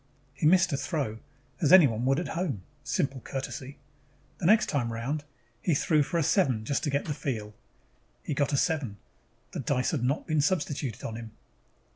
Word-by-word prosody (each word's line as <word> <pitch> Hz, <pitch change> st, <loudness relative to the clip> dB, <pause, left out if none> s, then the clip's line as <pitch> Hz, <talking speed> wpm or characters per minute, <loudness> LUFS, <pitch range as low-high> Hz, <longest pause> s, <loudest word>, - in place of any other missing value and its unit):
He 135 Hz, +3 st, +1 dB
missed 180 Hz, -1 st, +5 dB
a -, -, +1 dB
throw, 135 Hz, -9 st, -2 dB, 0.4 s
as 150 Hz, -, +3 dB
anyone 130 Hz, -11 st, +6 dB
would 135 Hz, +3 st, +3 dB
at 175 Hz, -, -4 dB
home: 155 Hz, -, -2 dB, 0.2 s
simple 135 Hz, 0 st, -1 dB
courtesy. 135 Hz, +1 st, -6 dB, 0.6 s
The 170 Hz, -, 0 dB
next 215 Hz, +2 st, +6 dB
time 125 Hz, -6 st, 0 dB
around, 135 Hz, +7 st, -3 dB, 0.4 s
he 170 Hz, -, +2 dB
threw 155 Hz, +2 st, +3 dB
for 160 Hz, +4 st, -1 dB
a 165 Hz, -, +2 dB
seven 130 Hz, -, +2 dB
just 140 Hz, -, -1 dB
to -, -, 0 dB
get 140 Hz, +1 st, 0 dB
the 150 Hz, -, -2 dB
feel. 110 Hz, -7 st, -4 dB, 0.7 s
He -, -, -2 dB
got 140 Hz, +1 st, +1 dB
a 140 Hz, -, +2 dB
seven. 140 Hz, -, 0 dB, 0.5 s
The 175 Hz, -, -5 dB
dice 130 Hz, -1 st, 0 dB
had 145 Hz, -8 st, -1 dB
not 135 Hz, +5 st, 0 dB
been 155 Hz, -3 st, +1 dB
substituted 145 Hz, -, -1 dB
on 110 Hz, -, -4 dB
him. 115 Hz, -2 st, -9 dB
140 Hz, 185 wpm, -28 LUFS, 125-155 Hz, 0.7 s, anyone